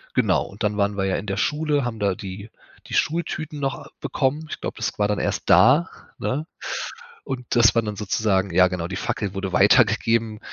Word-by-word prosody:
genau - - +2
und 100 +3 -9
dann 105 0 0
waren 100 0 0
wir 95 - 0
ja 95 - 0
in - - -4
der 95 -2 -3
Schule, 150 +1 0
haben 115 -2 -4
da 100 -2 +1
die 100 +3 -8 0.4
die - - -9
Schultüten 155 -2 -1
noch 135 -1 -4
bekommen. 145 +3 -1
Ich - - -6
glaube, - - -5
das 110 +1 -3
war 105 0 +1
dann 105 - 0
erst - - -2
da, 145 +10 +6 0.3
ne? 145 +4 -2 0.8
Und 125 -2 -5
das 115 -2 +6
war 115 - +3
dann 105 -1 -4
sozusagen 100 -2 0
ja 90 +1 +6
genau, 90 -2 -3
die 95 - -4
Fackel 100 0 -3
wurde 95 -1 -4
weitergegeben. 110 0 +3
110 Hz, 200 wpm, -23 LUFS, 100-130 Hz, 0.8 s, da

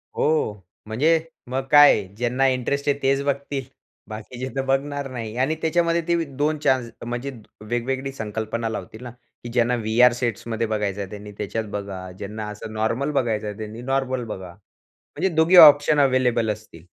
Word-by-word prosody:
हो, 155 -8 +1 0.3
म्हणजे 150 +10 +2 0.3
मग 130 +1 -1
काय 145 0 +9
आहे. 100 -3 -1
ज्यांना 125 +4 +1
इंटरेस्ट 130 +2 -1
आहे 140 - +2
तेच 135 +1 +2
बघतील. 140 -1 -2 0.5
बाकीचे 115 +4 -6
तर 135 - 0
बघणार 140 +1 -1
नाही. 115 -3 -6
आणि 135 +5 +1
त्याच्यामध्ये 170 +1 +1
ते 170 -1 +2
2 150 +2 +1
चान्स 130 -3 +2 0.2
म्हणजे 120 +3 -4 0.4
वेगवेगळी 130 +3 -2
संकल्पना 110 0 -3
लावतील 110 +2 -7
ना, 125 - -6 0.3
की 120 - -6
ज्यांना 125 0 +2
व्ही-आर 120 +2 +4
सेट्समध्ये 115 -2 -2
बघायचं 105 -2 -2
आहे 95 - -6
त्यांनी 105 0 -9
त्याच्यात 110 +2 -3
बघा. 95 -2 -6
ज्यांना 105 +2 -6
असं 105 +1 -8
नॉर्मल 115 +6 -1
बघायचं 115 -7 0
आहे 105 -1 -6
त्यांनी 110 +2 -7
नॉर्मल 130 -1 -1
बघा. 95 -5 -7 0.4
म्हणजे 180 +6 -3
दोघे 160 +3 +4
ऑप्शन 145 +1 +3
अवेलेबल 130 -4 +2
असतील. 100 -6 -13
125 Hz, 165 wpm, -23 LUFS, 110-140 Hz, 0.5 s, काय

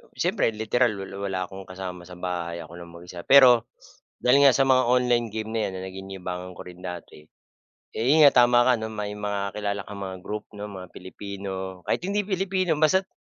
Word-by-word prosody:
siyempre, 115 - +1
literal 110 +2 +1
wal 95 0 -7 0.2
wala 95 -1 -2
akong 95 0 -9
kasama 90 -1 -7
sa 90 - -10
bahay, 85 -2 -4
ako 80 +1 -14
lang 85 -1 -11
mag-isa, 85 0 -10
pero 125 -4 +7 0.6
dahil 140 +3 +5
nga 135 - +7
sa 135 - +4
mga 130 -1 +5
online 125 -1 +2
game 110 0 -4
na 115 - 0
'yan - - -5
na 95 - -6
naging 95 +1 -9
libangan 90 -1 -6
ko - - -8
rin 90 0 -12
dati, 90 -4 -8 0.7
eh - - -1
'yun 155 +3 +6
nga, 140 - +8
tama 120 0 +4
ka, 130 - +5
may 105 -2 -5
mga 100 -1 -3
kilala 100 -1 -2
kang 100 -1 -8
mga 95 0 -6
group, 105 +2 -5
'no, 105 +1 -6
mga 95 -2 -9
Pilipino, 95 -1 -7
kahit - - +1
hindi 205 +1 0
Pilipino, 190 -4 0
basta't 190 +5 +3
100 Hz, 200 wpm, -25 LUFS, 95-125 Hz, 0.7 s, nga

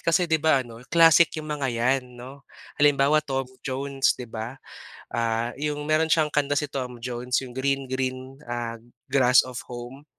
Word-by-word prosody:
Kasi 170 +2 +2
di 160 -2 +1
ba 145 -4 +3
ano 115 -1 -12
classic 165 0 +6
yung 155 - -5
mga 140 -3 -2
yan 125 +1 0
no? 130 +3 -11 0.4
Halimbawa 145 +1 +4
Tom 135 -3 -2 0.2
Jones, 135 0 0
'di 125 - -6
ba? 115 +3 -6 0.5
Ah, 115 0 -1
yung 150 0 -3
meron 155 +1 +3
siyang 155 -1 +2
kanta 145 -1 0
si 145 0 -1
Tom 125 -3 -5
Jones 125 +1 -5
iyong 130 - -8
Green, 135 0 -1
Green, 130 0 -3
ah, 120 -1 -4 0.3
Grass 130 -2 +5
of 125 -2 -8
Home, 125 +4 -9
135 Hz, 170 wpm, -25 LUFS, 125-145 Hz, 0.5 s, classic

